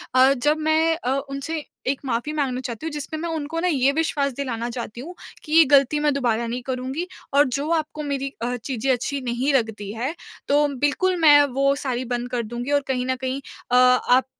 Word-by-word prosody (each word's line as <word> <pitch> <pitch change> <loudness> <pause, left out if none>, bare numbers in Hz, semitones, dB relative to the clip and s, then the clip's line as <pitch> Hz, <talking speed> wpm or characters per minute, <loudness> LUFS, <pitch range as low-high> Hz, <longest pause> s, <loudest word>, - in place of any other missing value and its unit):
अ, 260 +1 +6
जब 295 +4 +1
मैं 315 +1 +2
अ, 255 - -4 0.2
उनसे 295 +3 -4 0.2
एक 270 0 0
माफ़ी 245 +4 -2
माँगना 270 -4 -1
चाहती 245 +3 -6
हूँ, 320 - -3
जिसमें 300 +1 -4
मैं 335 - -3
उनको 315 +2 -3
ना 360 - 0
ये 275 -4 +3
विश्वास 285 -3 0
दिलाना 240 -3 -3
चाहती 235 -1 -6
हूँ 345 +7 -9 0.3
कि 305 - -10
ये 330 - +8
गलती 280 +2 +3
मैं 295 -1 +2
दोबारा 235 -4 0
नहीं 245 +2 -3
करूँगी। 260 +7 -3 0.3
और 285 +1 +6
जो 280 +4 -2
आपको 310 -2 -1
मेरी 275 -1 -3
अ, 245 +1 -1
चीज़ें 260 +2 -2
अच्छी 270 +3 -1
नहीं 255 +3 -1
लगती 220 -5 -1
है 250 +7 -3 0.3
तो 290 +1 +3
बिल्कुल 290 +8 +1
मैं 290 -2 +8
वो 275 +1 +3
सारी 255 -3 -3
बंद 245 0 -3
कर 240 -2 -1
दूँगी 240 +5 -5
और 285 0 +3
कहीं 250 -1 -1
न 260 - 0
कहीं 260 +2 -3 0.3
अ, - - +4
आप 250 0 +5
270 Hz, 210 wpm, -23 LUFS, 250-295 Hz, 0.3 s, ये